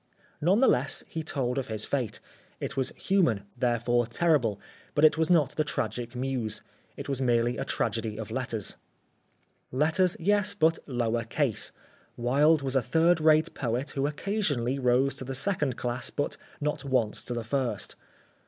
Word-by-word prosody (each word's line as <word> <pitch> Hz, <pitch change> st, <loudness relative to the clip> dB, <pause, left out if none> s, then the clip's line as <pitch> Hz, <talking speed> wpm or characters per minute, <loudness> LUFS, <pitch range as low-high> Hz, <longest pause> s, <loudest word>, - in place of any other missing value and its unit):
None 185 Hz, -, +3 dB
the 265 Hz, -, +6 dB
less 135 Hz, +3 st, +1 dB
he 160 Hz, -, -4 dB
told 135 Hz, -4 st, -1 dB
of 130 Hz, -, -4 dB
his 110 Hz, -1 st, -3 dB
fate. 130 Hz, -6 st, -2 dB, 0.4 s
It -, -, -4 dB
was 135 Hz, -1 st, +1 dB
human, 165 Hz, -, +2 dB
therefore 120 Hz, -1 st, +1 dB
terrible, 120 Hz, -, +1 dB, 0.4 s
but 150 Hz, -, +5 dB
it 155 Hz, -, +6 dB
was 160 Hz, 0 st, +1 dB
not 165 Hz, -6 st, +4 dB
the 155 Hz, -, +2 dB
tragic 125 Hz, -4 st, -3 dB
muse. 125 Hz, -4 st, -2 dB, 0.3 s
It -, -, -6 dB
was 135 Hz, -2 st, -2 dB
merely 120 Hz, -1 st, +2 dB
a -, -, -3 dB
tragedy 110 Hz, -2 st, -1 dB
of 110 Hz, -1 st, -6 dB
letters. 120 Hz, -6 st, -3 dB, 0.9 s
Letters, 160 Hz, +7 st, +2 dB
yes, 205 Hz, +3 st, +2 dB
but 165 Hz, -4 st, +3 dB
lower 120 Hz, -3 st, 0 dB
case. 120 Hz, 0 st, -1 dB, 0.5 s
Wilde 145 Hz, +5 st, +3 dB
was 135 Hz, 0 st, -2 dB
a 135 Hz, -, +4 dB
third 165 Hz, +6 st, +3 dB
rate 155 Hz, +1 st, +4 dB
poet 125 Hz, +3 st, -2 dB
who 140 Hz, 0 st, 0 dB
occasionally 145 Hz, -, -1 dB
rose 130 Hz, +2 st, +2 dB
to -, -, -3 dB
the 135 Hz, +1 st, -5 dB
second 145 Hz, -3 st, 0 dB
class 125 Hz, 0 st, -2 dB
but 145 Hz, -, -2 dB, 0.2 s
not 150 Hz, -1 st, -2 dB
once 130 Hz, -6 st, 0 dB
to 120 Hz, -, -3 dB
the 120 Hz, -, -3 dB
first. 130 Hz, +1 st, -2 dB
135 Hz, 165 wpm, -28 LUFS, 120-155 Hz, 0.9 s, the